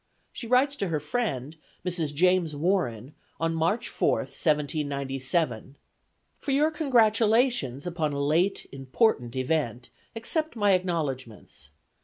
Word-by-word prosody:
She 235 - -6
writes 260 +4 +3
to 195 - -1
her 160 -3 -1
friend, 150 - -3 0.3
Mrs. 170 -4 -1
James 175 0 +2
Warren, 145 - -1 0.3
on 165 0 0
March 165 +7 0
4th, - - 0
1797: 140 -3 -1 0.6
"For - - -7
your 295 +4 +3
congratulations 225 - +2
upon 165 -4 -1
a 140 - -3
late 160 +7 +1
important 135 - 0
event 130 -3 -1 0.2
accept 310 +8 -2
my 205 -3 +3
acknowledgments. 135 - -3
160 Hz, 115 wpm, -27 LUFS, 140-210 Hz, 0.6 s, writes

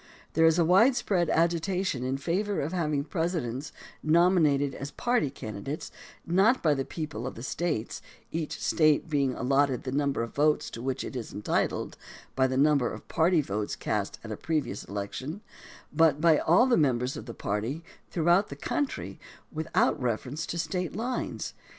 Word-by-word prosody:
There 165 +1 +5
is 160 +1 +4
a 170 - +4
widespread 195 - +3
agitation 170 -3 +1
in 130 +1 -1
favor 190 +8 -1
of 150 +5 -2
having 150 -5 0
Presidents 155 -4 -2 0.3
nominated 155 -4 +3
as 140 - -6
party 240 - 0
candidates, 110 +3 -6 0.3
not 195 +9 +3
by 155 -3 +4
the 135 -1 -1
people 150 -6 -5
of - - -6
the 115 - -8
States, 155 -5 -2 0.3
each 160 -2 -3
State 155 0 +2
being 140 -4 +1
allotted 135 0 +1
the 130 - -4
num 140 +1 +1
ber 115 - -1
of 115 - -7
votes 150 +1 +2
to 115 - -7
which 130 +1 -2
it - - -7
is 120 -3 -5
entitled 105 - -1 0.4
by 130 0 +3
the 130 0 -2
number 140 -3 +3
of - - -9
party 165 0 +3
votes 105 -4 -3
cast 105 -2 -2
at 110 - -7
a 105 - -4
previous 145 -10 -2
election, 130 - -5 0.5
but 160 -3 +4
by 160 -1 +5
all 180 +10 +5
the 255 -2 +3
members 130 -3 +1
of - - -8
the 115 - -7
party 115 +11 -3 0.3
throughout 175 +4 +3
the 140 - -6
country 275 - -3 0.3
without 155 -2 +1
reference 125 +6 -2
to 170 - -4
State 170 +1 -2
lines. 245 +4 -3
150 Hz, 170 wpm, -28 LUFS, 130-170 Hz, 0.5 s, There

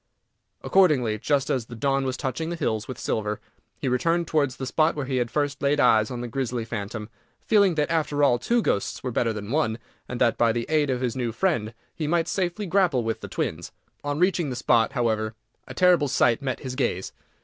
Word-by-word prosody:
Accordingly, 135 - +3
just 140 +3 +1
as 125 -4 -1
the 120 - -9
dawn 135 +3 0
was 130 0 -2
touching 145 +4 -3
the 170 - -3
hills 110 -10 -2
with 130 - -6
silver, 105 -1 -2 0.4
he - - -4
returned 165 +7 +1
towards 145 -5 0
the 135 - -5
spot 155 +4 +2
where 145 -3 -3
he 130 -1 -1
had 120 -1 0
first 145 -1 -1
laid 145 +1 +2
eyes 110 -5 +4
on 125 -1 -5
the 120 - -4
grisly 120 -2 -2
phantom, 105 -1 -5 0.3
feeling 200 -5 +3
that, 150 0 0
after 150 -3 +1
all, 125 -4 +4
two 235 - +1
ghosts 100 - -1
were 125 - -2
better 115 0 +1
than 105 0 -6
one, 125 -7 +1 0.3
and 125 - -4
that, 115 - +2
by 115 -1 +4
the 115 0 -2
aid 155 -2 +2
of 125 -1 -1
his 125 -2 -1
new 120 -3 -1
friend, 115 - -1 0.2
he 155 - -3
might 165 +1 +1
safely 190 +2 -1
grapple 175 -9 +2
with 115 0 -3
the - - -6
twins. - - -3 0.3
On 145 0 -2
reaching 180 -3 +2
the 125 - -4
spot, 120 +1 +2
however, 110 -4 0 0.3
a - - -9
terrible 180 -5 +4
sight 120 -3 +2
met 130 -2 -3
his 130 -2 -5
gaze. 120 -8 -2
130 Hz, 215 wpm, -25 LUFS, 115-155 Hz, 0.4 s, eyes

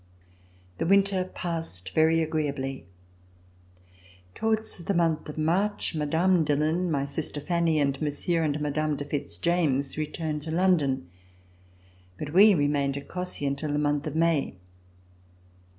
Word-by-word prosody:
The - - 0
winter 195 -1 +3
passed 165 - -5
very 160 +1 +4
agreeably. 140 - -3 1.5
Towards 220 -2 -1
the 185 +3 -2
month 165 -3 +1
of 150 - -8
March, 180 +8 0
Mme. 160 +3 +2
Dillon, 155 +4 +1
my 140 -3 0
sister 145 +1 -2
Fanny, 170 +1 +1
and 140 -1 0
Monsieur 155 +3 0
and 150 -2 0
Mme. 150 +1 -1
de 145 - -5
Fitz 145 0 -3
James 155 -5 0
returned 155 0 -3
to 160 - -8
London. 160 - +1 1.1
But 150 0 -6
we 200 +2 +7
remained 145 -2 +1
at 140 - -8
Cossey 180 -5 -3
until 140 +2 -2
the - - +1
month 145 0 0
of 155 - -5
May. 165 -8 +1
155 Hz, 135 wpm, -27 LUFS, 145-170 Hz, 1.5 s, we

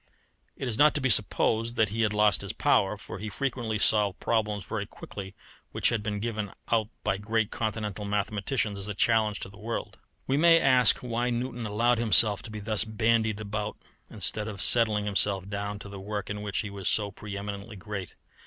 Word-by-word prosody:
It 135 - -5
is 110 -3 -3
not 150 0 +6
to - - +2
be 130 -1 0
supposed 115 +2 +3
that 110 -4 +2
he 110 +2 -2
had 110 -2 +2
lost 105 -1 +3
his - - -5
power, 100 +2 +2
for 100 - -9
he 105 +2 -5
frequently 120 -3 -2
solved 105 -2 +3
problems 105 -3 0
very 100 +2 -4
quickly 95 -2 -9 0.4
which - - +2
had 115 -2 -1
been 105 -1 -3
given 110 -2 -3 0.2
out 110 -2 +2 0.2
by 95 - 0
great 110 +1 -1
Continental 105 -2 -3
mathematicians 105 +1 -1
as 100 - -5
a 105 - -4
challenge 110 -1 +2
to - - -5
the 100 +1 -15
world. 115 +2 -5 0.3
We 135 - +1
may 165 +1 +6
ask 130 -5 +5
why 120 0 -1
Newton 120 -1 -3
allowed 115 +3 +2
himself 105 -2 +4
to 115 - -10
be 105 0 -6
thus 110 0 0
bandied 110 -1 +1
about 105 0 -4 0.3
instead 105 -1 -2
of 105 -3 -7
settling 110 -1 +4
himself 100 -2 +2
down 100 0 -4
to 100 - -10
the 100 -1 -8
work 105 +1 -4
in 105 0 -5
which 105 -2 -2
he 105 -3 -6
was 100 -2 -2
so 105 -2 0
pre 100 0 -7
eminently 100 +1 -6
great. 100 -1 -7
105 Hz, 200 wpm, -28 LUFS, 100-115 Hz, 0.4 s, not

